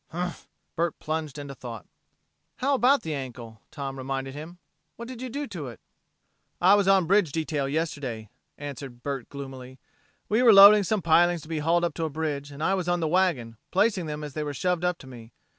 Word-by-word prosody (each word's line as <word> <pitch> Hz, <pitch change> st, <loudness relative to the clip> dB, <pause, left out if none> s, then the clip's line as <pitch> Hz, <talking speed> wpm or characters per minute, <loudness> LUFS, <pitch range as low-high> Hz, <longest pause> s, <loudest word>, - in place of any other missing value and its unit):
"Humph!" 175 Hz, +1 st, -5 dB, 0.3 s
Bert 170 Hz, -1 st, -1 dB
plunged 155 Hz, -2 st, -4 dB
into 140 Hz, -1 st, -7 dB
thought. 120 Hz, -5 st, -8 dB, 0.7 s
"How 275 Hz, +2 st, 0 dB
about 265 Hz, 0 st, +4 dB
the 160 Hz, -, -3 dB
ankle?" 120 Hz, -5 st, -7 dB
Tom 135 Hz, -2 st, -6 dB
reminded 135 Hz, 0 st, -4 dB
him. 155 Hz, +5 st, -9 dB, 0.4 s
"What 235 Hz, -, -8 dB
did 255 Hz, -1 st, -8 dB
you 255 Hz, -, -4 dB
do 285 Hz, +4 st, -4 dB
to 170 Hz, -9 st, -6 dB
it?" 115 Hz, -4 st, -10 dB, 0.8 s
"I 185 Hz, +3 st, +6 dB
was 205 Hz, -1 st, +3 dB
on 195 Hz, -1 st, +5 dB
a -, -, -4 dB
bridge 190 Hz, -3 st, +3 dB
detail 150 Hz, -3 st, -2 dB
yesterday," 140 Hz, -8 st, -3 dB, 0.3 s
answered 140 Hz, -4 st, -8 dB
Bert 135 Hz, -3 st, -4 dB
gloomily. 130 Hz, -2 st, -9 dB, 0.5 s
"We 220 Hz, +3 st, +2 dB
were 235 Hz, -3 st, +7 dB
loading 200 Hz, +1 st, +10 dB
some 200 Hz, 0 st, -1 dB
pilings 170 Hz, 0 st, +4 dB
to -, -, -13 dB
be 160 Hz, -2 st, -2 dB
hauled 170 Hz, +3 st, +2 dB
up 170 Hz, -, -2 dB
to 165 Hz, -, -2 dB
a -, -, -2 dB
bridge, 145 Hz, -2 st, -3 dB
and 140 Hz, +2 st, -7 dB
I 190 Hz, -, +2 dB
was 185 Hz, -2 st, -1 dB
on 175 Hz, 0 st, +1 dB
the 160 Hz, -, 0 dB
wagon, 155 Hz, -10 st, +1 dB
placing 195 Hz, -3 st, +1 dB
them 150 Hz, 0 st, -5 dB
as 145 Hz, -2 st, -7 dB
they 155 Hz, -, -3 dB
were 145 Hz, -1 st, -4 dB
shoved 180 Hz, +3 st, 0 dB
up 180 Hz, -1 st, +1 dB
to -, -, -14 dB
me. 120 Hz, -3 st, -12 dB
155 Hz, 210 wpm, -26 LUFS, 135-180 Hz, 0.8 s, loading